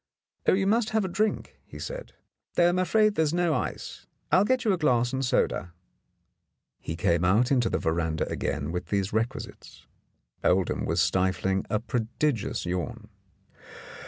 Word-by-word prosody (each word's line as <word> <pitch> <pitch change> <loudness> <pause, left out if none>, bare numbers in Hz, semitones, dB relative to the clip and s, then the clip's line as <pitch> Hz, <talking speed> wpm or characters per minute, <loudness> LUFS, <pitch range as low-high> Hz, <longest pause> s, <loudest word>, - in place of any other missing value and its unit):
"Oh, - - +6
you 195 +1 +2
must 220 +2 +2
have 215 - +1
a - - -1
drink," 210 +4 -2
he - - -12
said, - - -7 0.4
"though 175 0 +5
I'm 180 +1 +1
afraid 215 +4 +3
there 160 - +1
is 160 +1 +1
no 175 -2 +2
ice. - - -4 0.2
I'll 185 - +6
get 255 +3 +1
you 210 - +4
a - - 0
glass 125 -5 +2
and 135 0 -1
soda." 90 -8 0 1.1
He 80 - -5
came 85 -1 +1
out 105 +8 +3
into 125 -4 +3
the - - 0
veranda 80 -1 -1
again 75 +2 -2
with 90 +1 -4
these 100 -1 -1
requisites. 110 +2 -4 0.6
Oldham 95 -1 +1
was 85 +1 +1
stifling 95 +1 0
a 105 - +1
prodigious 115 +1 -1
yawn. 105 +5 -4
120 Hz, 160 wpm, -27 LUFS, -, 1.1 s, Oh